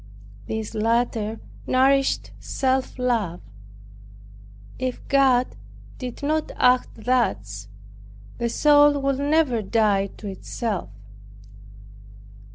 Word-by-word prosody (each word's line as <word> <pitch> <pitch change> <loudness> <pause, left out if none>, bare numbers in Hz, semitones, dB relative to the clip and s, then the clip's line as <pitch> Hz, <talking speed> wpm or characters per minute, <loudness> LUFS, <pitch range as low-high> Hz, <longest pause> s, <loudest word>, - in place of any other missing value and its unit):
This 220 0 -4
latter 225 0 0 0.3
nourished 270 +1 +2
self 265 -1 -1
love. 230 -9 -1 1.4
If 255 -1 -4
God 265 -3 +3 0.4
did 250 +1 -7
not 310 +2 0
act 250 -3 +2
thus, 105 - 0 0.7
the 235 - 0
soul 290 +2 +5
would 275 -1 0
never 285 -5 +2
die 205 -2 +2
to 210 - -8
itself. 200 - -4
245 Hz, 85 wpm, -23 LUFS, 220-270 Hz, 1.4 s, soul